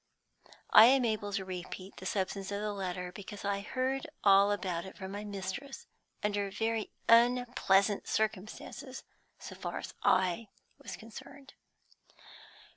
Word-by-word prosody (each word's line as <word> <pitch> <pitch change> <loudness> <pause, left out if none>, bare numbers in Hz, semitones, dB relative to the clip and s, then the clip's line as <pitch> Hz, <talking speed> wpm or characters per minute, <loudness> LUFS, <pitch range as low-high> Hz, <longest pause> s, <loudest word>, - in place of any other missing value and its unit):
I 220 - +10
am 260 +1 +5
able 215 -2 -1
to 195 -1 -1
repeat 185 +1 -7
the 190 - -6
substance 195 0 -2
of 200 - -2
the 210 0 -2
letter, 180 -2 -4
because 205 +1 -9
I 200 0 0
heard 260 +6 -2 0.2
all 200 0 +6
about 185 -4 -2
it 190 - -10
from 190 -1 -6
my 205 +1 -5
mistress, 205 +7 -6 0.4
under 205 -1 0
very 225 +2 -1 0.2
unpleasant 230 -4 +4
circumstances 215 -1 -3 0.3
so - - -9
far - - -5
as - - -6
I 185 +4 +2 0.3
was - - -7
concerned. 270 +5 -12
205 Hz, 135 wpm, -32 LUFS, 190-225 Hz, 0.4 s, I